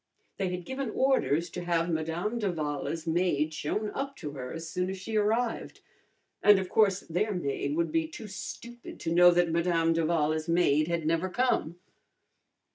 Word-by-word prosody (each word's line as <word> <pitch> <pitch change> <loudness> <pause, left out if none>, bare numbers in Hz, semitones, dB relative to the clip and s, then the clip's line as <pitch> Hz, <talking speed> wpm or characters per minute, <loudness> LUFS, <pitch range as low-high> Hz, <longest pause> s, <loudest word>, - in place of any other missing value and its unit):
They 195 -2 -1
had 180 -1 -5
given 265 +1 -3
orders 170 - +1
to 180 - -5
have 170 -1 +1
Madame 165 +8 -2
d'Avala's 155 -5 -2
maid 160 -2 +1
shown 210 +8 -2
up 275 0 -4
to 150 - -6
her 125 -3 -6
as 165 0 -6
soon 180 +3 -2
as 190 - -4
she 215 +4 -5
arrived, 225 +3 0 0.6
and 205 -1 +7
of 190 -1 -2
course 195 -3 +3
their 205 +6 -1
maid 140 -3 -2
would 165 -1 0
be 160 0 +1
too 190 +7 -9
stupid 235 +4 -8
to 165 - -1
know 175 +1 +8
that 175 -1 +3
Madame 165 -1 +2
d'Avala's 155 -1 0
maid 155 -3 +3
had 170 -2 -1
never 165 +3 +1
come. 240 -6 0
170 Hz, 170 wpm, -29 LUFS, 160-195 Hz, 0.6 s, know